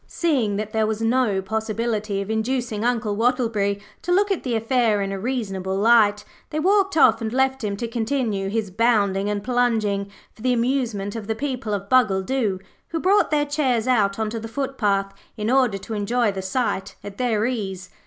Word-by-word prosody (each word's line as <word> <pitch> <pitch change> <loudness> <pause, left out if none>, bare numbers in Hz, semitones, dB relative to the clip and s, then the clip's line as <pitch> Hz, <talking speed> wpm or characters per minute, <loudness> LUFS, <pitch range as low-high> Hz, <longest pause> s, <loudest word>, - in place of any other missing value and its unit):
Seeing 260 - 0
that 215 +1 -4
there 220 -1 +2
was 220 0 -2
no 225 -5 +1
possibility 215 0 -2
of 205 - -6
inducing 225 -1 -1
Uncle 230 -4 0
Wattleberry 225 -4 +1 0.2
to 355 - -3
look 400 +3 +3
at 385 - 0
the 245 -3 -2
affair 225 -2 +2
in 195 -1 -2
a 195 - -4
reasonable 195 -5 -2
light, 210 -1 +4 0.3
they 305 - -2
walked 390 +1 +2
off 240 -5 +5
and 220 -1 -2
left 265 0 +1
him 200 -1 -2
to 235 - -3
continue 225 -4 -1
his 210 -2 -2
bounding 205 -2 +2
and 205 -1 -2
plunging 220 -5 0 0.2
for - - -17
the 250 +1 +2
amusement 235 -5 -1
of 220 -3 -6
the 220 - -1
people 255 -3 -3
of 200 -1 -2
Bungledoo, 215 -2 +2 0.3
who 325 - -3
brought 395 +5 +3
their 295 -1 +2
chairs 260 -6 0
out 205 -6 +2
on 220 -1 -2
to 230 - -3
the 225 - -6
footpath 215 -7 -1 0.2
in 215 +2 -1
order 255 -6 +3
to 220 - -7
enjoy 220 +2 +1
the 195 -1 -5
sight 190 0 -2
at 205 -1 -9
their 225 -4 +1
ease. 195 -7 -4
225 Hz, 190 wpm, -23 LUFS, 205-255 Hz, 0.3 s, off